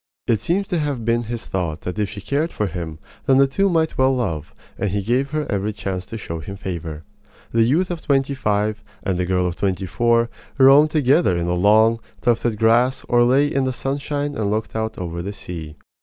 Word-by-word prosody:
It 110 -3 +1
seems 195 +8 0
to 175 -4 0
have 140 -6 -2
been 120 0 +1
his 115 +1 -5
thought 85 -4 -3
that 90 +4 -5
if 105 -2 0
she 105 -1 -8
cared 150 - -1
for 105 - -1
him, 85 -4 -5 0.3
then 135 -1 +5
the 140 - +6
two 195 +9 +1
might 160 -4 0
well 130 0 +4
love; 80 - -2 0.3
and 100 - 0
he 100 +1 -1
gave 125 +6 +1
her 155 0 -2
every 105 +1 -1
chance 95 -2 -4
to 115 - -6
show 85 -6 -5
him 100 +6 -7
favor. 85 -5 -5 0.5
The 115 - +2
youth 155 +11 +2
of 170 -2 -4
twenty 140 0 +1
five 105 -3 -1 0.2
and 95 -2 -1
the 90 - 0
girl 90 0 +1
of 90 -1 -2
twenty 95 -1 -1
four 115 +6 +2 0.3
roamed 140 +3 +7
together 140 - +3
in 85 - -1
the 85 - 0
long, 110 +5 +4 0.2
tufted 120 -2 +1
grass 115 +4 +3
or 120 -1 +5
lay 130 +4 +4
in 135 -2 0
the 130 - 0
sunshine 145 +2 -2
and 110 -7 -1
looked 110 +2 -2
out 110 0 -2
over 85 -1 -4
the 100 +3 -5
sea. 80 -6 -7
115 Hz, 215 wpm, -21 LUFS, 95-135 Hz, 0.5 s, roamed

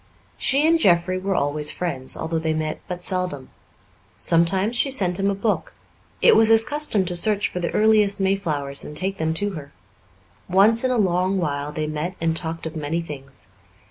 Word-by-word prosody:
She 275 +3 +2
and 330 0 +3
Jeffrey 185 - +2
were 195 +1 -2
always 150 0 0
friends, 140 -8 -3
although 160 0 -3
they 160 -1 -1
met 155 0 -3
but 180 0 -6
seldom. 180 -9 -2 0.7
Sometimes 185 +7 +2
she 275 - +1
sent 190 -9 +1
him 195 +1 +1
a 200 - -1
book; 210 +2 -2 0.5
it 470 - +7
was 225 - +6
his 225 0 +5
custom 295 -10 0
to 175 0 -1
search 205 +3 +2
for 180 - -5
the 175 - -2
earliest 210 -2 +3
mayflowers 160 -8 -1
and 150 - -3
take 190 +2 -1
them 160 0 -1
to 205 +4 -1
her; 150 -6 -9 0.8
once 210 +6 +4
in 255 - +1
a 250 - 0
long 185 -1 +1
while 145 -4 -3
they 155 +1 -3
met 155 +4 -4
and 165 0 0
talked 165 0 -5
of 160 0 -6
many 155 +2 -3
things. 140 -5 -9
180 Hz, 190 wpm, -22 LUFS, 155-200 Hz, 0.8 s, it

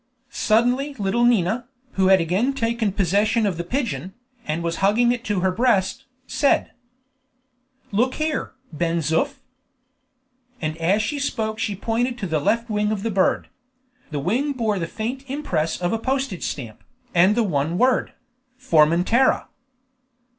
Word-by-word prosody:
Suddenly 245 +6 +1
little 215 +2 0
Nina, 235 +1 +2 0.2
who 190 -1 +2
had 190 0 +6
again 190 +11 +1
taken 230 -4 0
possession 205 +4 +1
of 195 -4 0
the 170 - -2
pigeon, 215 -3 -3 0.3
and 160 +2 -2
was 165 0 -2
hugging 220 +5 +3
it 245 -1 -3
to 205 -3 0
her 190 0 +2
breast, 235 +3 +1 0.2
said: 280 - +1 1.2
"Look 245 +6 +1
here, 310 0 -2 0.2
Ben 170 +2 0
Zoof!" 160 +2 0 1.2
And 155 -1 -2
as 185 +6 +2
she 290 +5 -2
spoke 220 -6 -2
she 210 -3 -1
pointed 235 +5 -1
to 210 - -4
the 160 -4 0
left 230 +10 +1
wing 210 -1 0
of 205 -2 -2
the 230 - -1
bird. 190 -1 +1 0.6
The 150 - -4
wing 245 - 0
bore 220 -6 -1
the 165 - -2
faint 250 +8 -5
impress 175 - -1
of 175 +2 -1
a 225 - 0
postage 265 -6 -2
stamp, 115 -7 -6 0.3
and 185 +4 +5
the 235 - +2
one 160 -3 -1
word: 255 +3 +2 0.4
"FORMENTERA." 180 +4 +3
210 Hz, 150 wpm, -22 LUFS, 175-245 Hz, 1.2 s, had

